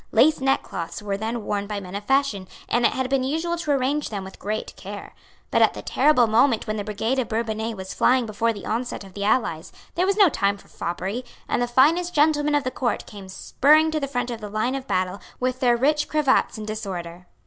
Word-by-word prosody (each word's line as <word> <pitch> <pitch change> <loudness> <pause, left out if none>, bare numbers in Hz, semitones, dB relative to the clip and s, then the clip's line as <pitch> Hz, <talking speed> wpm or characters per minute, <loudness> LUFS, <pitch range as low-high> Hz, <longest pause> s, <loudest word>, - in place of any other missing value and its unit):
Lace 290 +8 +4
neckcloths 265 -10 -1
were 200 -1 -2
then 220 +2 -3
worn 205 -1 -2
by 210 -1 -3
men 185 -1 -9
of 200 +1 -4
fashion; 270 -8 +1 0.2
and 240 0 +3
it - - -2
had 260 -1 -1
been 270 -1 +1
usual 325 +6 -1
to 335 -3 -6
arrange 280 +2 0
them 200 -3 -4
with 190 - -11
great 215 +2 -4
care. 200 +1 -9 0.4
But - - +3
at - - +4
the - - -7
terrible 295 -5 +4
moment 230 +2 +3
when 215 0 -3
the 205 - -2
brigade 220 +5 -1
of 255 - -1
Bourbonnais 220 0 -2
was 190 -1 -7
flying 255 -1 +3
before 225 +2 0
the 205 -3 -8
onset 235 0 -3
of 190 -1 -13
the 200 +1 -3
allies, 200 -7 0 0.2
there 360 +2 +1
was 395 +1 +1
no 405 -3 +7
time 200 -9 0
for - - -19
foppery; 190 +8 -4 0.2
and - - 0
the 245 - +1
finest 320 +9 +3
gentlemen 295 0 +3
of 290 - +2
the 255 - -2
Court 245 -2 -2
came 200 -3 -11
spurring 305 +10 +3
to 310 - 0
the 280 - -2
front 245 -2 -2
of 230 -1 -6
the 210 - -6
line 215 +5 -1
of 270 -1 -5
battle 185 +1 -1 0.2
with 255 0 -1
their 245 -2 +3
rich 295 +4 +2
cravats 295 -6 +2
in 215 - -6
disorder. 180 -5 -6
235 Hz, 230 wpm, -24 LUFS, 205-275 Hz, 0.4 s, no